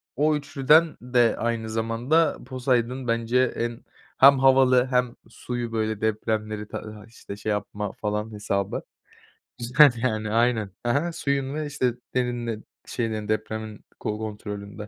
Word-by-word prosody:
o 150 Hz, +2 st, +2 dB
3'lüden 150 Hz, +3 st, +3 dB
de 120 Hz, -2 st, +2 dB
aynı 115 Hz, -1 st, -2 dB
zamanda 115 Hz, +8 st, +1 dB
Poseidon 125 Hz, -1 st, -1 dB
bence 115 Hz, +2 st, +1 dB
en 120 Hz, 0 st, -3 dB, 0.4 s
hem 135 Hz, 0 st, +7 dB
havalı 130 Hz, -1 st, +5 dB
hem 125 Hz, -1 st, +1 dB
suyu, 120 Hz, 0 st, -5 dB
böyle, 110 Hz, -1 st, -2 dB
depremleri, 110 Hz, -1 st, -2 dB
tadı 110 Hz, -, -7 dB
hay 105 Hz, +1 st, -12 dB
işte, 110 Hz, -3 st, -10 dB
şey 110 Hz, -, -4 dB
yapma 105 Hz, 0 st, -3 dB
falan 105 Hz, +1 st, -3 dB
hesabı. 100 Hz, -1 st, -2 dB, 0.8 s
Güzel, 125 Hz, +3 st, +6 dB
yani. 110 Hz, -3 st, -1 dB
Aynen. 115 Hz, -3 st, +2 dB
Ha 120 Hz, -, +1 dB
ha, 170 Hz, +5 st, 0 dB
suyun 140 Hz, -3 st, -1 dB
ve, 155 Hz, -1 st, -2 dB
işte, 130 Hz, -4 st, 0 dB, 0.2 s
derininin 120 Hz, -3 st, -2 dB, 0.2 s
şeylerin 110 Hz, -3 st, -3 dB
depremin 110 Hz, 0 st, -4 dB
ko 105 Hz, -, -3 dB
kontrolünde. 105 Hz, -2 st, -6 dB
115 Hz, 135 wpm, -25 LUFS, 110-130 Hz, 0.8 s, hem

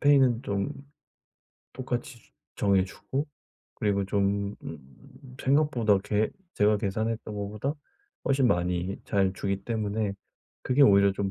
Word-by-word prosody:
페이는 135 Hz, -5 st, +5 dB
좀 100 Hz, -4 st, -1 dB, 1.0 s
똑같이 125 Hz, -2 st, -5 dB, 0.2 s
정해주고 100 Hz, +9 st, 0 dB, 0.5 s
그리고 100 Hz, -2 st, 0 dB
좀 100 Hz, 0 st, 0 dB
음 130 Hz, -, -12 dB
생각보다 130 Hz, -8 st, +3 dB
계 105 Hz, +2 st, 0 dB, 0.2 s
제가 105 Hz, 0 st, +3 dB
계산했던 110 Hz, +2 st, -2 dB
것보다 105 Hz, +8 st, -3 dB, 0.5 s
훨씬 135 Hz, -2 st, +3 dB
많이 90 Hz, 0 st, 0 dB
잘 95 Hz, -2 st, +1 dB
주기 100 Hz, 0 st, -2 dB
때문에 110 Hz, -2 st, -1 dB, 0.5 s
그게 135 Hz, +2 st, +3 dB
오히려 100 Hz, -3 st, +6 dB
좀 100 Hz, 0 st, -2 dB
105 Hz, 245 characters per minute, -28 LUFS, 100-125 Hz, 1.0 s, 오히려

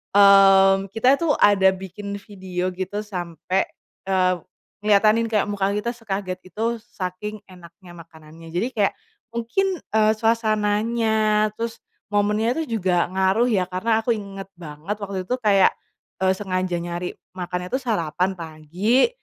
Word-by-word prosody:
mmm, 195 Hz, -1 st, +7 dB
kita 250 Hz, +5 st, +4 dB
itu 335 Hz, -, -1 dB
ada 195 Hz, -2 st, +5 dB
bikin 195 Hz, +2 st, -7 dB
video 185 Hz, -3 st, -4 dB
gitu 190 Hz, +3 st, -4 dB
sampe, 180 Hz, -1 st, -2 dB, 0.4 s
eee, 185 Hz, -1 st, +2 dB, 0.5 s
ngeliatanin 215 Hz, +2 st, +4 dB
kayak 215 Hz, -3 st, +1 dB
muka 200 Hz, -1 st, 0 dB
kita 210 Hz, +3 st, -1 dB
sekaget 195 Hz, -5 st, -4 dB
gitu 225 Hz, +6 st, -2 dB
saking 210 Hz, +1 st, -6 dB
enaknya 175 Hz, 0 st, -15 dB
makanannya 165 Hz, 0 st, -14 dB
jadi 185 Hz, +7 st, 0 dB
kayak, 200 Hz, -2 st, +2 dB, 0.4 s
mungkin, 235 Hz, +12 st, 0 dB, 0.2 s
eee, 215 Hz, 0 st, +4 dB
suasananya 215 Hz, -1 st, +1 dB
terus 230 Hz, 0 st, -4 dB, 0.3 s
momennya 210 Hz, +3 st, +2 dB
itu 235 Hz, -8 st, -2 dB
juga 180 Hz, -2 st, +1 dB
ngaruh 190 Hz, +6 st, +2 dB
ya 190 Hz, -5 st, +2 dB
karena 220 Hz, +5 st, +1 dB
aku 235 Hz, +1 st, +1 dB
inget 195 Hz, -2 st, -7 dB
banget 160 Hz, +4 st, -6 dB
waktu 195 Hz, -2 st, -4 dB
itu 250 Hz, -, +1 dB
kayak, 200 Hz, -4 st, +5 dB, 0.5 s
eee, 190 Hz, -, +4 dB
sengaja 185 Hz, -3 st, -2 dB
nyari 175 Hz, +1 st, -4 dB, 0.2 s
makannya 180 Hz, 0 st, -4 dB
tuh 265 Hz, -, 0 dB
sarapan 180 Hz, -5 st, 0 dB
pagi, 170 Hz, -, +1 dB
200 Hz, 135 wpm, -23 LUFS, 185-215 Hz, 0.5 s, mmm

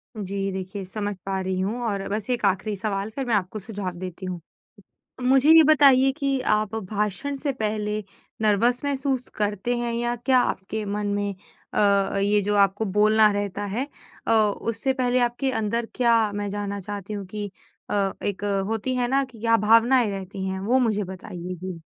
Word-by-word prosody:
जी, 195 Hz, -1 st, -3 dB
देखिए, 190 Hz, +1 st, -5 dB
समझ 205 Hz, +2 st, -4 dB
पा 195 Hz, 0 st, -1 dB
रही 185 Hz, 0 st, -2 dB
हूँ 215 Hz, +6 st, -2 dB
और 200 Hz, -3 st, -2 dB
बस 210 Hz, +3 st, -3 dB
एक 245 Hz, -4 st, 0 dB
आखिरी 200 Hz, +2 st, 0 dB
सवाल, 200 Hz, 0 st, -2 dB
फिर 270 Hz, -, -2 dB
मैं 235 Hz, -3 st, +1 dB
आपको 200 Hz, +2 st, -2 dB
सुझाव 200 Hz, -2 st, -5 dB
देती 185 Hz, +1 st, -7 dB
हूँ। 180 Hz, -1 st, -4 dB, 0.8 s
मुझे 265 Hz, +3 st, +4 dB
ये 325 Hz, 0 st, +9 dB
बताइए 275 Hz, -3 st, +6 dB
कि 275 Hz, -3 st, 0 dB, 0.2 s
आप 215 Hz, 0 st, -2 dB, 0.2 s
भाषण 210 Hz, +7 st, -1 dB
से 280 Hz, +1 st, -2 dB
पहले 215 Hz, -2 st, -2 dB, 0.4 s
नर्वस 235 Hz, +5 st, +3 dB
महसूस 270 Hz, -2 st, -1 dB
करते 210 Hz, +3 st, 0 dB
हैं 240 Hz, -1 st, -1 dB
या 240 Hz, +1 st, -1 dB
क्या 255 Hz, +2 st, +3 dB
आपके 215 Hz, +1 st, -3 dB
मन 205 Hz, +1 st, -2 dB
में 205 Hz, 0 st, -1 dB, 0.4 s
अ -, -, +3 dB
अ, 200 Hz, -1 st, +3 dB
ये 205 Hz, +1 st, +3 dB
जो 205 Hz, +1 st, 0 dB
आपको 200 Hz, +2 st, +3 dB
बोलना 215 Hz, +2 st, +4 dB
रहता 205 Hz, 0 st, -3 dB
है 235 Hz, +8 st, -2 dB, 0.4 s
अ, -, -, +2 dB
उससे 225 Hz, +4 st, +1 dB
पहले 255 Hz, -1 st, +1 dB
आपके 245 Hz, +3 st, 0 dB
अंदर, 230 Hz, 0 st, -1 dB
क्या 230 Hz, -4 st, +3 dB
मैं 205 Hz, 0 st, -3 dB
जानना 200 Hz, 0 st, -3 dB
चाहती 205 Hz, +1 st, -6 dB
हूँ 200 Hz, -1 st, -5 dB
कि 205 Hz, +1 st, -5 dB, 0.4 s
अ, 200 Hz, -1 st, +1 dB
एक 200 Hz, 0 st, -2 dB, 0.3 s
होती 225 Hz, +4 st, -1 dB
है 245 Hz, -1 st, +1 dB
ना, 270 Hz, +2 st, +2 dB
कि 250 Hz, -4 st, -12 dB
क्या 230 Hz, +1 st, +3 dB
भावनाएँ 230 Hz, +3 st, +4 dB
रहती 195 Hz, 0 st, -5 dB
हैं? 190 Hz, 0 st, -3 dB
वो 235 Hz, +7 st, +2 dB
मुझे 215 Hz, -4 st, +1 dB
बताइए। 180 Hz, -1 st, -7 dB
जी। 180 Hz, -1 st, -7 dB
210 Hz, 185 wpm, -24 LUFS, 200-240 Hz, 0.8 s, ये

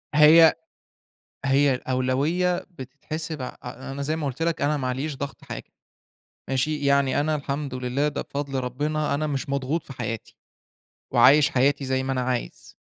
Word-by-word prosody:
هي 160 Hz, +2 st, +8 dB, 0.9 s
هي 135 Hz, 0 st, +3 dB
الأولوية 135 Hz, +8 st, 0 dB
بتتحسب 150 Hz, +1 st, -6 dB
ع 125 Hz, -, -3 dB, 0.2 s
أ 130 Hz, +2 st, -7 dB
أنا 140 Hz, +1 st, -4 dB
زي 155 Hz, +3 st, -1 dB
ما 155 Hz, -2 st, -3 dB
قُلت 135 Hz, +3 st, -4 dB
لك 165 Hz, -2 st, 0 dB
أنا 150 Hz, +1 st, +2 dB
ما 130 Hz, -3 st, -2 dB
علييش 135 Hz, +3 st, -3 dB
ضغط 140 Hz, 0 st, -6 dB
حاجة. -, -, -8 dB, 0.8 s
ماشي، 145 Hz, +3 st, -1 dB
يعني 140 Hz, -1 st, +3 dB
أنا 155 Hz, +1 st, +1 dB
الحمد 140 Hz, -1 st, -3 dB
لله 130 Hz, +3 st, -1 dB
ده 150 Hz, -, -3 dB
بفضل 140 Hz, -1 st, -3 dB
ربنا، 145 Hz, +4 st, -1 dB
أنا 155 Hz, +2 st, -1 dB
مش 140 Hz, -2 st, -3 dB
مضغوط 140 Hz, +4 st, -1 dB
في 135 Hz, -, -9 dB
حياتي، 115 Hz, -3 st, -5 dB, 0.8 s
وعايش 140 Hz, +5 st, +6 dB
حياتي 140 Hz, +2 st, +2 dB
زي 130 Hz, 0 st, 0 dB
ما 135 Hz, -, -2 dB
أنا 130 Hz, -1 st, 0 dB
عايز. 125 Hz, -1 st, -4 dB
140 Hz, 165 wpm, -25 LUFS, 130-150 Hz, 0.9 s, هي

